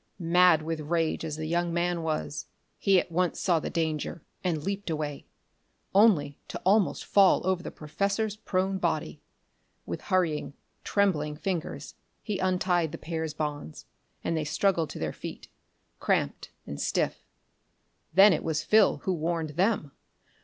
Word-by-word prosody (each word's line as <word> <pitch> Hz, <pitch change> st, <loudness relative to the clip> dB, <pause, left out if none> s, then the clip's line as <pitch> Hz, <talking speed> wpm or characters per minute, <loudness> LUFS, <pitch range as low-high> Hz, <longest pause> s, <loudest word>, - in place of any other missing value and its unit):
Mad 175 Hz, -2 st, +4 dB
with 160 Hz, 0 st, -3 dB
rage 165 Hz, +1 st, -1 dB
as 155 Hz, -2 st, -3 dB
the 155 Hz, -, -4 dB
young 170 Hz, +1 st, 0 dB
man 170 Hz, 0 st, 0 dB
was, 155 Hz, -2 st, -3 dB, 0.3 s
he 195 Hz, -2 st, +4 dB
at 175 Hz, -, -5 dB
once 180 Hz, +1 st, 0 dB
saw 175 Hz, -4 st, +2 dB
the -, -, -4 dB
danger 160 Hz, -1 st, -2 dB, 0.2 s
and 165 Hz, -5 st, -1 dB
leaped 200 Hz, +1 st, -3 dB
away 150 Hz, -3 st, -3 dB, 0.7 s
only 190 Hz, -9 st, +4 dB
to -, -, -6 dB
almost 200 Hz, 0 st, +3 dB
fall 195 Hz, -3 st, +4 dB
over 185 Hz, -1 st, +1 dB
the -, -, -6 dB
professor's 200 Hz, +7 st, -2 dB
prone 190 Hz, -2 st, -1 dB
body. -, -, -2 dB, 0.6 s
With -, -, -5 dB
hurrying, 170 Hz, -7 st, 0 dB, 0.3 s
trembling 155 Hz, -7 st, +1 dB
fingers 170 Hz, +2 st, -4 dB, 0.3 s
he 210 Hz, -4 st, -3 dB
untied 180 Hz, -3 st, +1 dB
the 165 Hz, -, -6 dB
pair's 160 Hz, -2 st, -4 dB
bonds, 145 Hz, -, -4 dB, 0.4 s
and 165 Hz, -, -1 dB
they 160 Hz, -, 0 dB
struggled 165 Hz, +1 st, +1 dB
to -, -, -7 dB
their 80 Hz, -1 st, -3 dB
feet, -, -, -8 dB, 0.5 s
cramped -, -, 0 dB, 0.2 s
and 70 Hz, -, -6 dB
stiff. -, -, -1 dB, 0.9 s
Then 195 Hz, +3 st, +7 dB
it 155 Hz, -, -1 dB
was 155 Hz, -1 st, -1 dB
Phil 215 Hz, +3 st, +4 dB
who 190 Hz, -, 0 dB
warned 165 Hz, -1 st, -1 dB
them. 180 Hz, -2 st, +1 dB
170 Hz, 150 wpm, -28 LUFS, 155-190 Hz, 0.9 s, Then